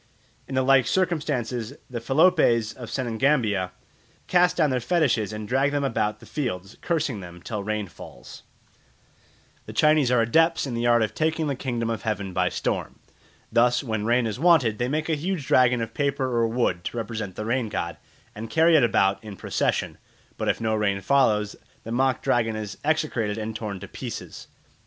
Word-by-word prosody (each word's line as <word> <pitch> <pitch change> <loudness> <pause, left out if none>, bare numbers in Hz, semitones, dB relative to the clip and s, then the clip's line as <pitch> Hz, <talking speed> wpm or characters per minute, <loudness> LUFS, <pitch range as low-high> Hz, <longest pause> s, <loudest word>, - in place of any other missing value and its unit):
In 135 - -5
the 130 - +2
like 130 -2 +4
circumstances 140 -10 -1
the 120 -3 -5
Feloupes 135 -6 +3
of 125 -3 -9
Senegambia 115 -6 +1 0.6
cast 180 0 +3
down 155 -5 +3
their 130 - +1
fetishes 120 - +1
and 105 0 -6
drag 135 +4 +2
them 145 -1 0
about 105 -5 -1
the - - -14
fields, 100 -9 -4
cursing 155 - -1
them 90 -2 -10
till 105 +3 -5
rain 105 0 -2
falls. - - -12 1.3
The - - -7
Chinese 150 -4 +4
are 125 -1 +3
adepts 165 +9 +3
in 130 - -4
the 120 +1 0
art 120 -1 +4
of 110 -1 -2
taking 160 +2 0
the 140 -2 -1
kingdom 120 -3 -2
of 115 - -3
heaven 105 -4 -3
by 90 0 +1
storm. - - -3 0.5
Thus, 120 +3 +3
when 110 -4 -2
rain 120 +2 +2
is 110 +2 -3
wanted 145 -10 +4
they 120 - 0
make 155 +4 -1
a 165 - +1
huge 160 0 -2
dragon 125 -2 +4
of 115 0 -7
paper 140 -2 0
or 115 -1 +2
wood 115 -7 0
to - - -4
represent 110 -4 -4
the 105 - -5
rain 120 0 0
god, 85 -5 -3 0.4
and 110 +2 -7
carry 165 +1 +4
it 150 - +5
about 100 -4 +2
in 105 -2 -8
procession; - - -1 0.4
but - - -3
if - - 0
no 110 -1 0
rain 105 -2 +1
follows, 105 -2 +2 0.3
the 115 - -7
mock 130 +2 +1
dragon 115 -2 +1
is 105 -2 -5
execrated 145 -9 0
and 110 0 -4
torn 105 -3 -5
to - - -9
pieces. - - -8
120 Hz, 185 wpm, -25 LUFS, 110-140 Hz, 1.3 s, it